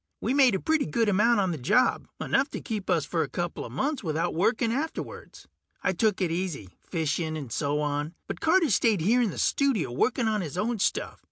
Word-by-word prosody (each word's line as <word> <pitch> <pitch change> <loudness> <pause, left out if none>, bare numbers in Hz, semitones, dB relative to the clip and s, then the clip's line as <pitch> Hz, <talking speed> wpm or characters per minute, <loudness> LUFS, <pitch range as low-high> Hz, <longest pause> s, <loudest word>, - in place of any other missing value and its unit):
We - - -1
made 265 -6 +5
a - - -1
pretty 315 - +1
good 220 +8 +1
amount 210 +3 +3
on 190 -2 0
the 160 - -4
job, 200 - +2
enough 280 - +1
to - - -5
keep 215 -4 -5
us - - +2
for - - -1
a - - -2
coupla - - -4
months 285 -2 -2
without 160 -1 -1
working 225 +6 +1
afterwards. 310 +5 -5 0.4
I 190 - +1
took 205 +2 +1
it 175 -3 +1
easy, 165 - -3
fishing 160 -1 -2
and 135 -6 -7
so 145 +4 -1
on, 150 +2 -2
but - - -6
Carter 325 -3 +3
stayed 210 -2 +3
here 230 +9 +3
in 230 - +2
the - - -7
studio 245 - +1
working 235 - +1
on 215 -2 +1
his 165 -1 -5
own 225 +3 -1
stuff. - - -1
200 Hz, 210 wpm, -27 LUFS, 160-240 Hz, 0.4 s, made